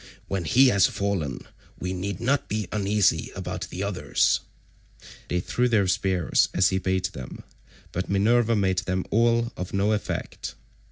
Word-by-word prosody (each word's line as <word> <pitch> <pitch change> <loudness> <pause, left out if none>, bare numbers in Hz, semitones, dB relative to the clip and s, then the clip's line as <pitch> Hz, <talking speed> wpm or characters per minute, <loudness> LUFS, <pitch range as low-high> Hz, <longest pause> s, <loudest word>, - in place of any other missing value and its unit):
When 95 -3 -2
he 130 - +5
has 100 -5 +4
fallen 95 -10 -2 0.4
we 90 +1 -3
need 95 +1 -4
not 135 +4 0
be 105 -2 -2
uneasy 100 -6 +1
about - - -5
the 95 - -4
others." 100 -2 +1 0.9
They 90 - 0
threw 125 +7 0
their 110 -4 +3
spears 90 -2 +2
as 95 -1 +4
he 95 - 0
bade 95 0 0
them, 65 -1 -8 0.5
but 90 +2 -3
Minerva 115 +4 +3
made 95 -3 +1
them 95 -1 -2
all 115 +1 +2
of 90 +1 -5
no 100 +2 +2
effect. 105 -1 -3
100 Hz, 155 wpm, -25 LUFS, 90-110 Hz, 0.9 s, he